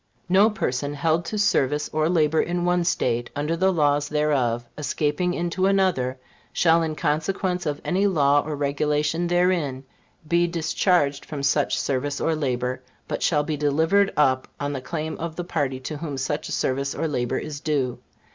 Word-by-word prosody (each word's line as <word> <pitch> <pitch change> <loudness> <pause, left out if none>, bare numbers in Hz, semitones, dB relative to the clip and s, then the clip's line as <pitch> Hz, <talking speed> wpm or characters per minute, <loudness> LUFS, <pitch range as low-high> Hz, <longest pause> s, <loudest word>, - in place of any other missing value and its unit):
"No 195 +4 +5
person 145 - -2
held 160 +3 +1
to 215 - -4
service 150 -7 +1
or 155 +1 +1
labor 160 -2 +3
in 175 0 -1
one 180 0 +2
State, 120 -8 0
under 150 +3 -1
the 190 +3 +2
laws 145 -3 +1
thereof, 135 -6 +1
escaping 155 +4 -1
into 175 +2 0
another, 185 -10 +1 0.3
shall 165 -1 +3
in 160 -1 -2
consequence 180 +4 -1
of 145 -1 -2
any 195 +3 +2
law 145 -6 +3
or 150 0 -4
regulation 150 +3 0
therein, 175 -7 +1 0.4
be 175 +2 +3
discharged 160 -3 +1
from 145 -3 -6
such 140 +1 +1
service 140 +1 -1
or 165 - +1
labor, 130 -3 -2 0.3
but - - -3
shall 150 -3 +2
be 155 0 -2
delivered 160 +8 +2
up 130 -3 +2
on 145 0 -2
the 135 - -4
claim 155 +3 -4
of 165 -1 -4
the 175 - -3
party 135 -6 -2
to 150 +3 -5
whom 145 -3 -5
such 135 +3 -2
service 135 +1 -1
or 160 +2 -1
labor 125 -5 -1
is 150 -2 -5
due." 140 -5 -1
150 Hz, 170 wpm, -24 LUFS, 140-175 Hz, 0.4 s, No